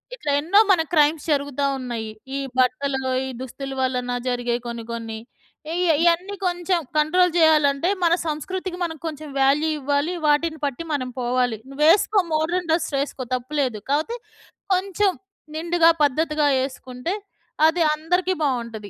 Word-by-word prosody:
ఇట్లా 305 -12 -3
ఎన్నో 350 +8 +4
మన 355 - +4
క్రైమ్స్ 300 -1 +3
జరుగుతా 285 -1 0
ఉన్నాయి. 235 -4 -4 0.3
ఈ - - -2 0.2
బట్టలు, 265 +2 +1 0.2
ఈ - - -4
దుస్తుల 270 +1 -6
వలన 250 -1 -1 0.2
జరిగే 245 -1 0
కొన్ని 235 -1 -5
కొన్ని. 225 -1 -5 0.6
ఈ - - -2
య - - +6
ఇయన్నీ 350 +4 +2
కొంచెం 355 0 0 0.2
కంట్రోల్ 360 +4 +3
జేయాలంటే 305 -1 +4
మన 340 -1 +4
సంస్కృతికి 355 +4 -4
మనం 320 -2 -3
కొంచెం 310 -1 -5
వాల్యూ 290 +4 +3
ఇవ్వాలి. 285 +5 0
వాటిని 310 +1 +2
పట్టి 285 +4 -4
మనం 255 -3 -2
పోవాలి. 245 -2 0
నువ్వేస్కో 335 +8 +4
మోడర్న్ 335 +2 0
డ్రెస్ 330 - +1
ఎస్కో 270 -2 -7
తప్పు 255 +4 -6
లేదు. 245 -5 -1
కాపోతే 315 +12 0 0.6
కొంచెం 390 +1 +1 0.5
నిండుగా 335 0 +4
పద్ధతిగా 300 +1 +1 0.2
ఏసుకుంటే 260 +5 -5 0.5
అది 335 +2 +1
అందరికి 360 +4 0
బావుంటది. 235 -6 -2
300 Hz, 140 wpm, -23 LUFS, 255-340 Hz, 0.6 s, య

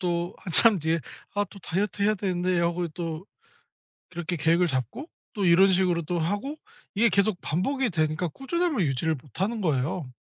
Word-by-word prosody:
또 175 -1 -1
한참 195 +3 +5
뒤에 160 +2 0 0.3
'아 205 0 +1
또 200 - -12
다이어트 200 +4 -2
해야 215 +1 +3
되는데.' 185 -2 0
하고 170 0 0
또 165 +1 -5 0.9
이렇게 175 0 -3
계획을 170 +3 +3
잡고 130 - -3 0.2
또 200 -4 -1
이런 190 +3 +6
식으로 180 -2 +2
또 175 +2 -2
하고. 205 - -2 0.4
이게 230 +2 +4
계속 200 -1 +1
반복이 245 - -1
되니까 155 +1 0
꾸준함을 300 - -1
유지를 155 +5 0
못하는 200 - -3
거예요. 145 -2 -1
180 Hz, 345 characters per minute, -26 LUFS, 165-205 Hz, 0.9 s, 이런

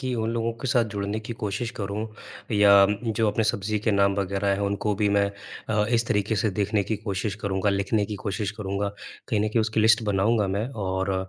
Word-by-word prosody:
कि 130 -2 -2
उन 110 -1 -1
लोगों 115 0 -1
के - - -2
साथ 120 -3 +3
जुड़ने 100 +2 -2
की 115 +2 -6
कोशिश 105 +3 -2
करूँ, 100 0 -3 0.5
या 100 -1 +7 0.3
जो 110 +1 +1
अपने 105 +2 0
सब्जी 105 0 0
के 110 +2 0
नाम 100 0 +3
वगैरह 100 0 -1
हैं 100 - -1
उनको 100 +1 0
भी 105 0 +1
मैं 100 0 +3 0.4
अ, 105 -1 +2
इस 115 -1 +2
तरीके 105 +1 0
से 110 - +1
देखने 105 +1 0
की 110 - -2
कोशिश 100 -1 -3
करूँगा, 100 0 0
लिखने 100 +2 +1
की 105 - -5
कोशिश 100 -1 -2
करूँगा। 100 -1 -3 0.4
कहीं 110 -4 +1
न 105 - +1
कहीं 115 +1 +1
उसकी 110 0 0
लिस्ट 110 +1 +5
बनाऊँगा 105 +1 +2
मैं 100 +4 -1
और 95 -4 -2
105 Hz, 215 wpm, -25 LUFS, 100-110 Hz, 0.5 s, या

